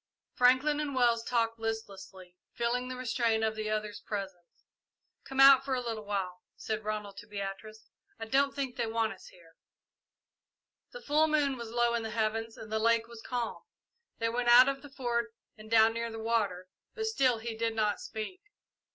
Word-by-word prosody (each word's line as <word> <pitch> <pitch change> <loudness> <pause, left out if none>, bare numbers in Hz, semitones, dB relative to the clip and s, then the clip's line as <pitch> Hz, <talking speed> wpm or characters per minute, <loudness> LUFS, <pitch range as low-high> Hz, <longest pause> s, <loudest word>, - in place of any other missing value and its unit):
Franklin 260 +4 +4
and 290 -3 -3
Wells 235 -2 +3
talked 230 -1 0
listlessly, 195 -5 -6 0.2
feeling 245 +1 -1
the 255 - -5
restraint 230 -3 0
of 220 0 +1
the 215 0 -3
others' 215 -1 -3
presence. 190 -4 -7 0.6
"Come 270 0 -5
out 270 -1 +9
for 270 -1 -1
a - - -1
little 225 -3 -5
while," 190 -3 -3
said 220 0 -4
Ronald 210 -2 -4
to 205 - -10
Beatrice. 210 +1 -7 0.3
"I 225 - -4
don't 275 +4 +2
think 270 -3 -3
they 235 -2 -1
want 225 -1 0
us 190 - -15
here." 170 -2 -18 1.4
The - - -10
full 305 +2 +3
moon 295 -3 +1
was 235 -2 -7
low 240 0 +1
in 235 - 0
the 225 - -4
heavens 225 0 -2
and 215 - -10
the 220 - 0
lake 230 0 +2
was 235 -1 -11
calm. 240 -1 -3 0.6
They 230 - 0
went 240 +1 0
out 245 +2 +9
of 275 0 -1
the 290 - -12
Fort 235 -4 -2 0.2
and 215 0 -13
down 225 0 +5
near 230 0 -3
the 225 - -7
water, 215 -5 -1 0.3
but 440 - -2
still 265 - +2
he 225 0 -5
did 225 0 -1
not 210 -2 +1
speak. 220 - -6
230 Hz, 185 wpm, -30 LUFS, 215-250 Hz, 1.4 s, out